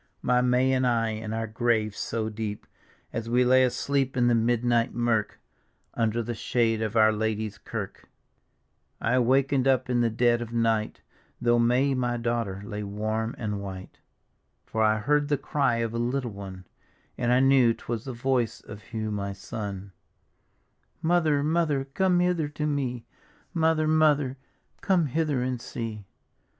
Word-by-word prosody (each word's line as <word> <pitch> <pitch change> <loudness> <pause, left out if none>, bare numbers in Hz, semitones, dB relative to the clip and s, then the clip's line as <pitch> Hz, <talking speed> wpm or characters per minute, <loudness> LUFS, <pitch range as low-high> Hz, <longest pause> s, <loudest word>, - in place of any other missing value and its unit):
My 125 0 +3
May 125 +1 +3
and 130 -1 +2
I, 115 -2 +1
in 110 0 -5
our 115 0 -2
grave 110 -2 0
so 110 -1 -2
deep. 105 -1 -5 0.5
As 115 0 -4
we 125 +1 +3
lay 130 +1 +5
asleep 130 +1 0
in 120 - +3
the 120 - +4
midnight 120 0 +1
mirk, 120 -3 0 0.5
Under 115 0 0
the 120 +2 -4
shade 115 -1 0
of 110 0 -2
Our 110 -1 +6
Lady's 110 -1 -2
Kirk, - - -7 0.9
I 125 +3 +2
waken'd 135 +2 +2
up 130 -1 +2
in 120 -1 +2
the 120 - +2
dead 120 +1 +2
of 115 -1 -6
night, 115 -2 0 0.4
Though 120 0 +3
May 125 +4 +3
my 120 -2 -1
daughter 115 -5 -2
lay 105 -1 -5
wann 110 +3 -3
and 105 -3 -3
whit^ 95 -1 -8 0.7
For 110 - -2
I 110 0 +4
heard 145 +6 +1
the 145 -1 +1
cry 135 -2 0
of 115 -1 -2
a 115 - -2
little 120 0 -1
one, 95 -2 -9 0.5
And 120 -1 0
I 125 - +5
knew 135 -3 +5
'twas 115 0 -5
the 135 - -4
voice 125 -2 0
of 105 0 -10
Hugh 110 0 -4
m; 100 0 -4
son: 100 -1 -6 1.1
"Mother, 160 -4 +2
Mother, 155 -3 +1
come 180 +6 +1
hither 180 -4 +1
to 150 +1 -4
mc; 130 -5 -2 0.5
Mother, 160 -1 +2
Mother, 150 -4 +3 0.4
come 185 -4 +2
hither 145 -2 0
and 125 -2 -2
see! 110 -4 -6
120 Hz, 160 wpm, -26 LUFS, 110-135 Hz, 1.1 s, Our